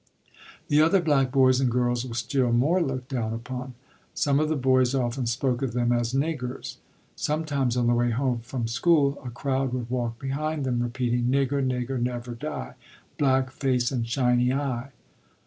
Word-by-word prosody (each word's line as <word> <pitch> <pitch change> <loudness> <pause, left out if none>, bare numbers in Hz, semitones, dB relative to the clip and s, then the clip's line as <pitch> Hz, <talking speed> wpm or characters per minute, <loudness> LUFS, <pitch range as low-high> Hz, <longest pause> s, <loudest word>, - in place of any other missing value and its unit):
The 150 0 +5
other 165 +5 +4
black 140 -6 +2
boys 130 -1 +4
and 130 -2 +2
girls 120 0 0
were 115 - -6
still 125 +1 0
more 145 +10 +3
looked 135 -5 -3
down 115 -5 -2
upon. 125 +2 -6 0.4
Some 140 -1 +2
of 155 0 +1
the 155 - +1
boys 130 -1 +2
often 125 -1 -1
spoke 125 +1 0
of 130 -4 -2
them 120 0 +1
as 120 -1 +1
"niggers." 135 -2 -3 0.4
Sometimes 145 -5 -1
on 120 - +2
the 120 - +3
way 120 0 +2
home 125 +1 0
from 120 0 -4
school 140 +3 +2
a 125 - -5
crowd 130 +1 -1
would 120 -2 -4
walk 120 -2 -2
behind 145 +3 -2
them 120 -2 0
repeating: 120 0 -1
"Nigger, 140 +2 +1
nigger, 130 0 -1
never 120 0 -3
die, 130 - -6 0.5
Black 130 -2 +2
face 130 -3 0
and 120 -3 -2
shiny 125 0 +2
eye." 135 -2 -2
130 Hz, 175 wpm, -26 LUFS, 120-140 Hz, 0.5 s, The